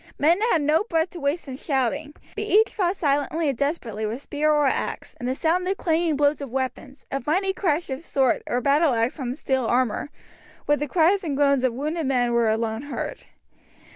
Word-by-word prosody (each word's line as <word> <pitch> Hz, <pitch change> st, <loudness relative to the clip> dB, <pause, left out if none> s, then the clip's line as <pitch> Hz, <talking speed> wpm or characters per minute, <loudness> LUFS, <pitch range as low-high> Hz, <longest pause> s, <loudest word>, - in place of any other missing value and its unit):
Men 335 Hz, +7 st, +3 dB
had 315 Hz, -, +2 dB
no 305 Hz, +6 st, +3 dB
breath 330 Hz, -5 st, 0 dB
to 350 Hz, -, -8 dB
waste 290 Hz, +3 st, -1 dB
in 260 Hz, -1 st, -6 dB
shouting, 285 Hz, +1 st, -1 dB, 0.2 s
but 425 Hz, 0 st, -3 dB
each 435 Hz, +2 st, +3 dB
fought 370 Hz, -2 st, 0 dB
silently 295 Hz, 0 st, 0 dB
and 275 Hz, -, -1 dB
desperately 240 Hz, -6 st, -2 dB
with 235 Hz, +6 st, -5 dB
spear 300 Hz, +1 st, 0 dB
or 295 Hz, -1 st, +3 dB
axe, 270 Hz, -, -2 dB
and 245 Hz, -, -3 dB
the 260 Hz, -, -1 dB
sound 350 Hz, +5 st, +1 dB
of 390 Hz, +1 st, 0 dB
clanging 325 Hz, -1 st, +1 dB
blows 290 Hz, +1 st, +2 dB
of 280 Hz, -, -5 dB
weapons, 265 Hz, +1 st, -4 dB
of 275 Hz, -1 st, -4 dB
mighty 380 Hz, +5 st, +1 dB
crash 340 Hz, -3 st, 0 dB
of 265 Hz, +4 st, -4 dB
sword 270 Hz, -6 st, +1 dB
or 245 Hz, -, 0 dB
battleaxe 280 Hz, -3 st, +2 dB
on 250 Hz, -1 st, -3 dB
steel 265 Hz, -5 st, -1 dB
armour, 250 Hz, +2 st, 0 dB, 0.6 s
with 295 Hz, 0 st, +2 dB
the 295 Hz, -, -2 dB
cries 360 Hz, +6 st, +3 dB
and 290 Hz, -5 st, -2 dB
groans 280 Hz, -2 st, +3 dB
of 255 Hz, -2 st, +2 dB
wounded 305 Hz, +3 st, -2 dB
men 245 Hz, -3 st, +1 dB
were 235 Hz, -1 st, +3 dB
alone 220 Hz, +1 st, -1 dB
heard. 290 Hz, +1 st, -6 dB
285 Hz, 200 wpm, -24 LUFS, 260-325 Hz, 0.6 s, Men